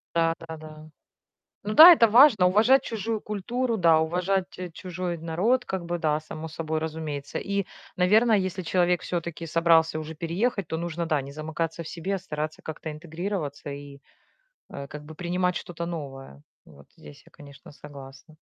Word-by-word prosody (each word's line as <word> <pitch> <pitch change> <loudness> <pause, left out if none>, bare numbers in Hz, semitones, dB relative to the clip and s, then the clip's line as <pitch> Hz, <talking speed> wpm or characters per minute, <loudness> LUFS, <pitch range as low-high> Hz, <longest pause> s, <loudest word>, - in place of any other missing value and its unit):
Да, 165 0 +2
да, 160 - -6
да. 155 0 -12 0.8
Ну 210 +1 -3
да, 340 +3 +12
это 230 -7 +5
важно- 225 -4 +6
уважать 225 +8 +4
чужую 225 0 -3
культуру, 230 +4 -2
да, 165 -3 +5
уважать 180 +3 0 0.3
чужой 180 -1 -5
народ, 185 +11 0
как 190 -2 -4
бы, 175 0 -3
да, 155 -1 +1
само 155 +1 -8
собой 160 0 -3
разумеется. 155 -3 -5
И, 200 -1 -2 0.3
наверное, 215 +5 +4
если 185 -1 -3
человек 180 0 +1
всё-таки 170 -1 -4
собрался 165 -1 +3
уже 155 0 -7
переехать, 185 +4 -2
то 160 - -3
нужно, 170 0 -3
да, 155 -4 0
не 140 +1 -9
замыкаться 160 +2 -4
в - - -9
себе, 190 +4 -3
а - - -4
стараться 155 -3 -5
как-то 160 0 -6
интегрироваться 160 -1 -5
и, 140 0 -9 0.7
э, 140 0 -7
как 150 +1 -9
бы 160 +1 -11
принимать 180 +1 -1
что-то 170 -1 -5
новое. 135 - -8 0.2
Вот 70 -2 -17
здесь 75 -1 -14
я, - - -19
конечно, 140 0 -14
согласна. 140 -1 -13
165 Hz, 165 wpm, -26 LUFS, 155-185 Hz, 0.8 s, да